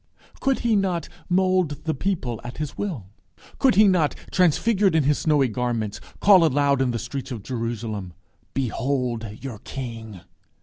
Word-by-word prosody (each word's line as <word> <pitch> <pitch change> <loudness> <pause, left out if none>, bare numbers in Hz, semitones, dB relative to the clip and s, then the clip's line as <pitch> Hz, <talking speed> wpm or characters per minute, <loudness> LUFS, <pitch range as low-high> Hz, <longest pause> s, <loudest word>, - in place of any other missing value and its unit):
Could 270 -1 +1
he 230 -2 +2
not 185 -5 0 0.2
mould 185 -5 +1
the 160 - 0
people 135 - -2
at 120 +1 -8
his 150 -3 -4
will? 140 - -4 0.5
Could 265 -7 +4
he 210 +1 +7
not, 175 -6 +2 0.2
transfigured 190 +2 +3
in 160 - +4
his 145 +1 +2
snowy 150 -4 +3
garments, 115 -3 -2 0.2
call 195 -4 +7
aloud 140 -2 +3
in 130 - +2
the 120 - -1
streets 125 +3 -5
of 115 -6 -6
Jerusalem, 115 -6 -4 0.4
"Behold 125 -2 -1 0.2
your 125 -6 -6
King?" 115 -6 -7
135 Hz, 155 wpm, -24 LUFS, 120-180 Hz, 0.5 s, he